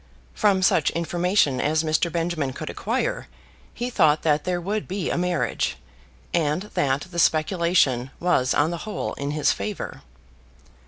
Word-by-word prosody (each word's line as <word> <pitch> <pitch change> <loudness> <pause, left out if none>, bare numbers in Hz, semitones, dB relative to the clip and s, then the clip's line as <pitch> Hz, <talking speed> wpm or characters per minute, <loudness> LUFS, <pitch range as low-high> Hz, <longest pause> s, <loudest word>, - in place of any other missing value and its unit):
From 195 -3 +2
such 160 -5 +3
information 170 -4 +1
as 155 +2 +1
Mr. 160 +2 +1
Benjamin 165 -5 -1
could - - -6
acquire - - -2 0.4
he 245 +1 -4
thought 155 -8 +3
that 150 -2 +2
there 180 -1 0
would 205 +4 -3
be 190 -1 -2
a - - 0
marriage, 170 - -1 0.6
and 155 +1 +1
that 135 0 +1
the 170 - -3
speculation 155 -6 +2
was 150 -8 +2
on 150 +3 +2
the 170 - -3
whole - - -3
in 140 0 -4
his 150 0 +2
favour. 210 -2 -5
165 Hz, 150 wpm, -24 LUFS, 150-180 Hz, 0.6 s, such